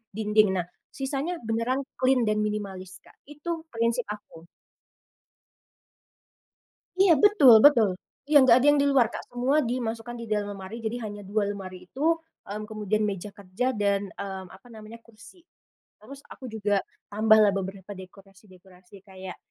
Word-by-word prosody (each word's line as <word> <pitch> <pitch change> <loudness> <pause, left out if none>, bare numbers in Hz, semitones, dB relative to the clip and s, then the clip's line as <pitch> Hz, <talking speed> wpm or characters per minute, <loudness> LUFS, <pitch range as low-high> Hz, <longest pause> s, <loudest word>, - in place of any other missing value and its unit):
dinding. 210 -2 +2
Nah 180 - 0 0.2
sisanya 275 +6 -4
beneran 230 +4 -1 0.2
clean 255 -1 +3
dan 215 -1 0
minimalis 195 -3 -4
Kak - - -20
itu 320 +3 -6
prinsip 230 -2 -1
aku. 205 -5 -10 2.5
Iya, 380 -2 +6
betul 395 - +7
betul, 235 -8 +6 0.4
iya, 290 0 +6
nggak 260 -2 +6
ada 255 - +1
yang 290 0 +4
di 285 - +2
luar 270 -4 +4
Kak - - -8
semua 255 +5 +1
dimasukkan 240 -1 -4
di 235 - -7
dalam 210 -2 -2
lemari 195 +5 -8
jadi 225 +2 -3
hanya 205 -1 -7
2 205 +1 -1
lemari 185 -2 -7
itu, 310 - 0 0.2
mmm, 210 +1 -7
kemudian 215 0 -2
meja 200 -1 -4
kerja 200 +5 -3
dan, 200 -1 0
mmm, 190 -1 -6
apa 195 +6 -16
namanya? 220 +1 -11
Kursi, 230 - -18 0.6
terus 275 +6 -12
aku 260 - -11
juga 205 -2 0 0.3
tambahlah 215 0 +4
beberapa 195 +1 -6
dekorasi-dekorasi 190 0 -16
kayak, 190 -1 -10
215 Hz, 145 wpm, -26 LUFS, 195-250 Hz, 2.5 s, betul